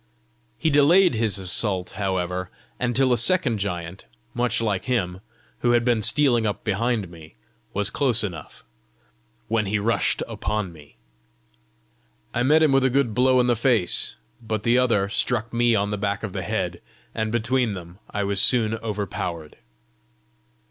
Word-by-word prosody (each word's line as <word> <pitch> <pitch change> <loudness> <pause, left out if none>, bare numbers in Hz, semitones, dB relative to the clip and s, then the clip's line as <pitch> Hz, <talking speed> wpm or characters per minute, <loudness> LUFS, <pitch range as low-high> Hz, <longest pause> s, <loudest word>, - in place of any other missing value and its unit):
He 160 - 0
delayed 165 +6 +5
his 110 -4 0
assault, 95 0 0
however, 90 -2 -2 0.3
until 125 +1 +2
a - - +2
second 185 - +2
giant, 90 -2 -5 0.3
much 120 -2 0
like 105 -5 -1
him, 95 -8 -1 0.4
who 120 0 +2
had 120 -1 +2
been 120 -3 +2
stealing 120 -1 +3
up 105 - -4
behind 110 0 -1
me, 80 -2 -14 0.4
was 100 0 0
close 120 -4 +1
enough, 90 -6 -7 0.8
when 110 -1 0
he 105 +2 0
rushed 115 +3 0
upon 105 -5 -3
me. 75 -4 -17 1.4
I 120 - 0
met 150 +5 +4
him 155 - +4
with 135 -1 +3
a 130 - +3
good 130 -3 +1
blow 130 +2 +3
in 125 - +3
the 120 -1 +2
face, 115 -5 0 0.3
but 110 -2 -3
the 115 +2 +3
other 115 -6 +2
struck 115 +2 -1
me 120 0 +3
on 100 -1 0
the 105 - -3
back 100 0 -2
of - - -5
the - - -3
head, - - -3 0.3
and 110 -1 -2
between 120 -1 0
them 90 +1 -11
I 105 - -2
was 100 0 +2
soon 110 -1 +3
overpowered. 100 -7 -5
110 Hz, 160 wpm, -23 LUFS, 100-120 Hz, 1.4 s, delayed